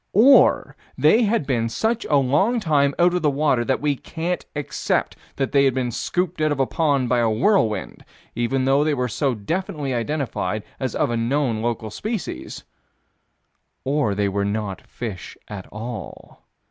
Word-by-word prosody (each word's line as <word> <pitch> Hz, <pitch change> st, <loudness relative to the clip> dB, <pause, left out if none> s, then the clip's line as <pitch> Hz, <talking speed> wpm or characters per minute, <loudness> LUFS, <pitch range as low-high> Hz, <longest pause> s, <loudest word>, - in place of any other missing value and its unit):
Or 265 Hz, +6 st, +5 dB, 0.2 s
they 230 Hz, +1 st, +4 dB
had 215 Hz, -7 st, +1 dB
been 120 Hz, -4 st, 0 dB
such 225 Hz, -, -1 dB
a 150 Hz, -, +1 dB
long 145 Hz, -, +2 dB
time 145 Hz, -7 st, +2 dB
out 175 Hz, +1 st, +4 dB
of 180 Hz, -2 st, -1 dB
water 145 Hz, -4 st, +2 dB
that 130 Hz, +2 st, 0 dB
we 145 Hz, -1 st, +1 dB
can't 170 Hz, +5 st, -4 dB
accept 150 Hz, -1 st, -1 dB, 0.2 s
that 135 Hz, -1 st, -1 dB
they 140 Hz, -1 st, +4 dB
had 135 Hz, -, +2 dB
been 125 Hz, -2 st, -1 dB
scooped 175 Hz, +6 st, -2 dB
out 155 Hz, 0 st, +2 dB
of 145 Hz, -, -1 dB
a 135 Hz, -, +3 dB
pond, 140 Hz, -4 st, +1 dB
by 125 Hz, 0 st, +2 dB
a 115 Hz, -1 st, +2 dB
whirlwind 110 Hz, -, +1 dB, 0.3 s
even 130 Hz, +3 st, 0 dB
though 135 Hz, +2 st, +3 dB
they 150 Hz, -1 st, +1 dB
were 125 Hz, -2 st, -1 dB
so 130 Hz, +2 st, -1 dB
definitely 145 Hz, -, -3 dB
identified 120 Hz, -6 st, -2 dB, 0.2 s
as 130 Hz, -4 st, -3 dB
of -, -, +1 dB
a 120 Hz, -, 0 dB
known 120 Hz, -1 st, 0 dB
local 115 Hz, -2 st, -2 dB
species 215 Hz, -, -5 dB, 1.2 s
Or 135 Hz, -7 st, 0 dB
they 100 Hz, 0 st, +1 dB
were 100 Hz, +1 st, -1 dB
not 100 Hz, -1 st, -3 dB
fish 110 Hz, -7 st, -7 dB
at 100 Hz, -3 st, -8 dB
all. 110 Hz, -3 st, -8 dB
135 Hz, 170 wpm, -22 LUFS, 115-155 Hz, 1.2 s, Or